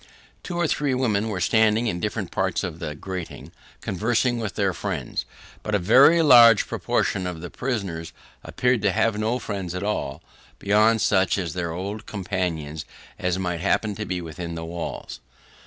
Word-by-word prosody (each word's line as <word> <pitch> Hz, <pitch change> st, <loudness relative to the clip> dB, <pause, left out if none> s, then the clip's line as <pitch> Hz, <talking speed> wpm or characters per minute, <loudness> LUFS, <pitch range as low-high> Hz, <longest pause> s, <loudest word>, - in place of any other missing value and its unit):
Two 175 Hz, -, -5 dB
or 175 Hz, -, +1 dB
three 145 Hz, -3 st, 0 dB
women 110 Hz, -4 st, 0 dB
were 100 Hz, -4 st, -3 dB
standing 110 Hz, +4 st, +3 dB
at 90 Hz, -5 st, -2 dB
different -, -, -3 dB
parts -, -, -1 dB
of -, -, -5 dB
the 75 Hz, -, -5 dB
grating, 90 Hz, +2 st, -7 dB, 0.3 s
conversing 120 Hz, +5 st, 0 dB
with 110 Hz, -6 st, -4 dB
their 100 Hz, -2 st, +1 dB
friends, 85 Hz, -10 st, -4 dB, 0.4 s
but 105 Hz, -, -2 dB
a -, -, +5 dB
very 140 Hz, -, +6 dB
large 120 Hz, -6 st, +8 dB
proportion 95 Hz, -2 st, -1 dB
of 90 Hz, -2 st, -5 dB
the 90 Hz, +1 st, -8 dB
prisoners 100 Hz, -11 st, -3 dB, 0.3 s
appeared 125 Hz, -2 st, 0 dB
to 100 Hz, -, +2 dB
have 105 Hz, +1 st, +1 dB
no 110 Hz, +3 st, 0 dB
friends 95 Hz, -7 st, -5 dB
at 90 Hz, -, -3 dB
all, 80 Hz, -8 st, -3 dB, 0.3 s
beyond 110 Hz, +2 st, +3 dB
such 95 Hz, -1 st, +2 dB
of 90 Hz, -5 st, -3 dB
their 90 Hz, -2 st, -3 dB
old 100 Hz, +5 st, -5 dB
companions 90 Hz, -6 st, -3 dB, 0.4 s
as 90 Hz, 0 st, 0 dB
might 90 Hz, -2 st, -2 dB
happen 105 Hz, +2 st, +1 dB
to 105 Hz, +1 st, -5 dB
be 90 Hz, -1 st, -2 dB
within 85 Hz, +1 st, -6 dB
the 80 Hz, 0 st, -5 dB
walls. 85 Hz, 0 st, -6 dB
100 Hz, 170 wpm, -24 LUFS, 90-110 Hz, 0.4 s, large